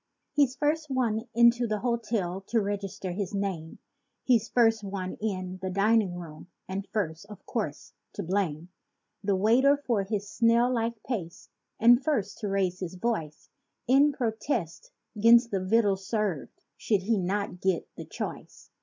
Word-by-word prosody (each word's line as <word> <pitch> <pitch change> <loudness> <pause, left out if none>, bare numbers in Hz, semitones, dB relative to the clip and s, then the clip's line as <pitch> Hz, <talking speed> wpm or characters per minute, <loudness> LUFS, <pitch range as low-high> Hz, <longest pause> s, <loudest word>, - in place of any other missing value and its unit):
He's 280 -3 +3
first 300 +1 0
one 235 -4 0
into 235 0 +5
the 215 -2 -2
hotel 225 -6 -1
to 230 - +2
register 200 -2 -3
his 195 +2 -3
name; 190 -5 -3 0.5
He's 235 -3 +2
first 225 -3 +3
one 190 -2 -4
in 185 -3 -3
the 190 - -2
dining 200 0 +2
room 165 -2 -9 0.2
and 195 +1 -4
first, 195 -4 -3
of 210 -2 -12
course 200 -11 -4 0.2
to 200 - -4
blame 175 -3 -2 0.5
The 200 -1 +1
waiter 245 +9 +4
for 240 -7 0
his 200 +1 -3
"snail 235 +3 +3
like 230 -2 -2
pace," 185 -9 -5 0.3
and 240 +3 +6
first 235 -10 -1
to 210 - -3
raise 190 -2 0
his 185 -1 -5
voice 180 -7 -3 0.4
In 275 +4 +5
protest 220 - -3 0.3
'gainst 235 +2 +6
the 195 -2 -1
victuals 195 -2 +2
served, 210 -9 -2 0.2
should 205 -4 0
he 220 +1 +1
not 190 0 -2
get 190 -3 0
the - - -8
choice. - - -7
205 Hz, 155 wpm, -28 LUFS, 185-235 Hz, 0.5 s, and